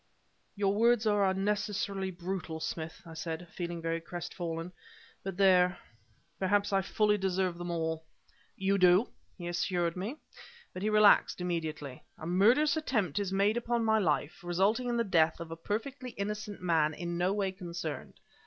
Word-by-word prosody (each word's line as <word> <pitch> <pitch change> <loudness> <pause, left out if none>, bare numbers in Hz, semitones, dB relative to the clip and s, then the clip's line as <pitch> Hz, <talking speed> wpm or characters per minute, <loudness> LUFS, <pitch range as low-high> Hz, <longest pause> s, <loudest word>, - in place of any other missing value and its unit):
"Your 200 -1 +1
words 230 +2 +3
are 205 -2 +3
unnecessarily 200 0 -1
brutal, 175 -2 -4
Smith," 160 0 -5
I 165 - -10
said, 160 +2 -5
feeling 170 -2 -4
very 165 0 -1
crestfallen, 170 0 -5 0.5
"but 195 -2 -5
there 180 -2 +5 0.6
perhaps 200 +1 +1
I 195 - +4
fully 210 +2 +2
deserve 185 -2 0
them 175 0 -4
all." 160 -1 -2 0.5
"You 195 +1 +1
do!" 185 +5 +5 0.3
he 175 -2 -6
assured 175 -1 0
me, 200 +9 -4 0.6
but 185 - -6
he 210 - +1
relaxed 210 -2 +5
immediately. 160 -6 -4
"A - - -8
murderous 235 - +4
attempt 220 - 0
is 200 -2 -2
made 200 +3 +2
upon 235 -1 0
my 220 0 +4
life, 175 0 0
resulting 200 +8 +1
in 240 - 0
the 235 - +2
death 165 -5 +2
of 165 -1 -7
a - - -4
perfectly 240 - -4
innocent 210 0 -4
man 160 -3 +2
in 175 0 -4
no 180 +2 +2
way 200 -2 0
concerned. 170 -4 -6
190 Hz, 160 wpm, -31 LUFS, 170-205 Hz, 0.6 s, there